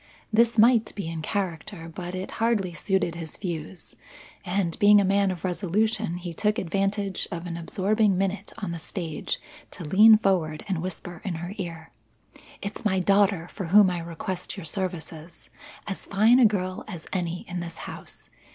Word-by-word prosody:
This 235 +1 +4
might 225 0 +5
be 200 -5 -4
in 165 -1 -4
character 175 -1 -3
but 175 +2 -6
it 185 +1 -5
hardly 215 -6 +1
suited 190 0 0
his 165 -2 -7
views; 175 -1 -6 0.5
and, 180 -2 -1
being 205 0 +7
a - - +3
man 200 +1 +3
of 180 -3 -4
resolution, 200 +2 0
he 175 -1 -6
took 210 +5 +1
advantage 195 +2 -1
of 170 0 -5
an 170 -1 -4
absorbing 195 +4 +1
minute 195 +1 -1
on 200 -5 -4
the 170 - -4
stage 165 -2 -3 0.3
to 175 - -9
lean 215 +7 +8
forward 180 -6 0
and 185 -5 -1
whisper 175 -1 -6
in 185 -4 -3
her 175 +4 -5
ear: 165 -3 -6 0.7
"It's 200 +1 -5
my 190 -4 +2
daughter 195 -2 +3
for 190 - -5
whom 190 +2 +6
I 175 - -2
request 170 +3 -5
your 190 - -7
services; 170 -2 -5 0.3
as 195 - -5
fine 220 +5 +5
a 240 - +8
girl 185 -3 -2
as 175 -6 -8
any 175 -2 -2
in 180 0 -4
this 170 -1 -6
house. - - -10
185 Hz, 170 wpm, -26 LUFS, 170-205 Hz, 0.7 s, lean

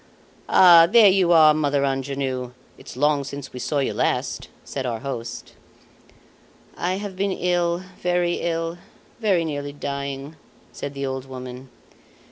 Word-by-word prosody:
"Ah! 170 -2 +8
there 215 -2 +7
you 185 -2 +2
are, 155 -2 +7
Mother 145 -2 +1
Angenoux! 135 -2 -3 0.2
It's - - -12
long 145 +1 +2
since 140 0 -8
we 125 - -7
saw 145 - -2
you 135 - 0
last," - - -2 0.2
said 135 - -4
our 120 -3 -3
host. 120 -4 -6 1.2
"I 180 +1 -1
have 200 -1 -6
been 195 0 -1 0.6
very 175 -1 +1
ill, 165 0 -2 0.4
very 195 -7 +1
nearly 145 -2 -4
dying," 140 +1 -5 0.3
said 140 0 -7
the 140 0 -3
old 130 -1 -4
woman. 130 0 -9
145 Hz, 135 wpm, -23 LUFS, 135-170 Hz, 1.2 s, Ah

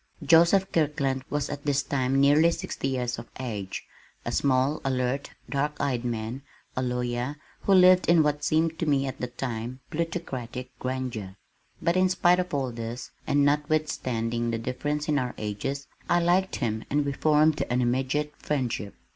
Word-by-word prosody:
Joseph 170 +4 +5
Kirkland 140 -4 0
was 145 -1 -1
at 145 0 -6
this 145 -1 +1
time 135 -1 +1
nearly 145 +4 +6
sixty 165 - -3
years 125 -3 -2
of 115 - -10
age, 105 -7 -4 0.4
a - - -2
small, 135 +2 +2
alert, 130 +1 -1 0.2
dark 145 +1 -1
eyed 130 -4 0
man, 120 +2 -3 0.3
a 130 - 0
lawyer, 125 +2 -2 0.3
who 195 - +4
lived 185 -1 +6
in 170 -2 +6
what 150 0 0
seemed 160 +2 +1
to 165 - -1
me 140 -2 +2
at 135 - -5
the 125 - -1
time, 125 0 -5
plutocratic 130 -7 -4
grandeur, 125 -7 -4 0.5
but 170 - +2
in 185 0 +4
spite 180 -1 +4
of 180 0 -2
all 135 -3 -1
this, 115 +1 -6 0.2
and 145 0 +3
notwithstanding 130 -6 0
the 115 - -1
difference 145 +6 -2
in 150 -2 +2
our 125 -2 -3
ages, 110 +7 -3 0.2
I 175 - +4
liked 180 +2 +2
him 110 -3 -2
and 145 +1 +1
we 140 - 0
formed 155 +1 +3
an 125 +1 +1
immediate 130 +4 0
friendship. 125 -8 -2
135 Hz, 165 wpm, -27 LUFS, 125-150 Hz, 0.5 s, nearly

